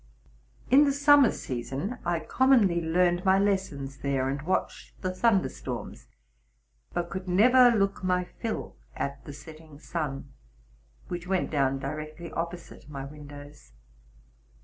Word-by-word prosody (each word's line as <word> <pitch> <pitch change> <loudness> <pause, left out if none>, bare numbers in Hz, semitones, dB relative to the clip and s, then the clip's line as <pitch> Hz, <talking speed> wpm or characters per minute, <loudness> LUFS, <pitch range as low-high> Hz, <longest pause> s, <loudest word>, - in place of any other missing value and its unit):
In 285 +3 +7
the 280 - +2
summer 285 -2 +6
season 135 - -4
I 170 -1 -1
com 260 +9 +1
monly 195 -10 +4
learned 175 +2 +2
my 190 0 +4
lessons 190 -9 -1
there, 135 -1 -1
and 140 +1 -3
watched 185 +5 -3
the 185 0 -1
thunder 200 0 +2
storms, 65 -1 -7 0.8
but 175 0 -3
could 185 +1 -5
never 245 +7 +6
look 200 -4 0
my 180 0 +1
fill 220 +5 -6 0.2
at. 140 0 -4
the - - -7
setting 155 +1 -13
sun, 145 -4 -5 0.7
which 175 0 -5
went 190 -1 0
down 135 -3 +1
directly 155 +4 -6
opposite 170 -2 -6
my 135 -2 -6
windows. 145 - -12
170 Hz, 135 wpm, -27 LUFS, 145-195 Hz, 0.8 s, In